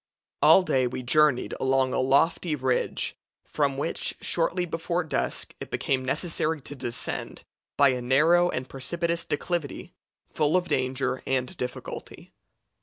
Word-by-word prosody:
All 190 - +7
day 130 -7 +1
we 125 +1 -5
journeyed 150 0 +3
along 130 0 +2
a - - +1
lofty 150 +5 +2
ridge, 130 -2 -1 0.3
from 140 -2 -1
which, 155 +4 -1
shortly 175 +1 0
before 170 +1 -2
dusk, 160 - -2
it - - -7
became 130 -1 -1
necessary 160 +3 +1
to 140 - -9
descend 120 -4 -4 0.3
by 140 -1 +6
a 125 -1 -1
narrow 160 +8 +4
and 130 -4 -3
precipitous 170 +6 -2
declivity, 155 0 -3 0.4
full 155 +4 +2
of 180 -1 -1
danger 130 0 -1
and 130 -1 -1
difficulty. 125 - -7
140 Hz, 135 wpm, -26 LUFS, 130-165 Hz, 0.4 s, All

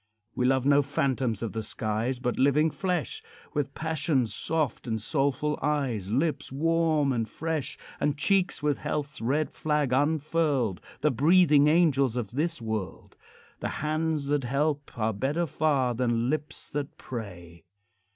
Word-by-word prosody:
We 125 - +1
love 130 0 +2
no 145 0 +5
phantoms 130 -5 -1
of 115 - -2
the 110 - -3
skies, 110 +4 -1
But 125 0 -2
living 150 +4 +4
flesh, 180 -3 -2 0.3
With 140 -2 -2
passion's 155 -6 0
soft 155 -6 -1
and 110 -1 -1
soulful 140 +5 0
eyes, 130 -10 -1
Lips 150 +5 0
warm 155 -1 +2
and 115 -2 -1
fresh, 160 -4 -3 0.2
And 145 0 0
cheeks 185 0 +1
with 150 -2 +1
health's 145 -3 -3
red 145 +7 0
flag 150 -4 0
unfurled, 145 - +1 0.2
The 150 +1 +3
breathing 150 +2 +5
angels 140 -6 +3
of 115 -5 -3
this 155 +4 -1
world. 110 -7 -5 0.4
The - - -2 0.2
hands 155 -1 0
that 145 -2 +1
help 145 +3 -1
are 110 0 0
better 140 +11 0
far 140 -5 +1
Than 120 0 0
lips 150 -1 -4
that 145 -1 -4
pray. 90 -8 -8
140 Hz, 145 wpm, -27 LUFS, 120-155 Hz, 0.4 s, no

